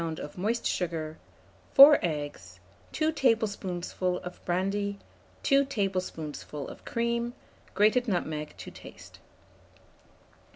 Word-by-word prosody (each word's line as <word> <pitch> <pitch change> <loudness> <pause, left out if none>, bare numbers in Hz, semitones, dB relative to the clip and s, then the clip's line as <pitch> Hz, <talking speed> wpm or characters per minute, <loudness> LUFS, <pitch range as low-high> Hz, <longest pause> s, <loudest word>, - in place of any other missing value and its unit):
of 145 - -7
moist 220 +6 -1
sugar, 160 -3 -2 0.6
4 285 +2 +10
eggs, 145 - -4 0.3
2 315 0 +1
tablespoonfuls 200 - 0
of 180 - -9
brandy, 200 +3 -1 0.5
2 275 -1 +4
tablespoonfuls 185 - -3
of - - -13
cream, 235 +1 -1 0.4
grated 220 +5 +3
nutmeg 155 -6 -2
to - - -9
taste. - - -13
190 Hz, 95 wpm, -28 LUFS, 165-235 Hz, 0.6 s, 4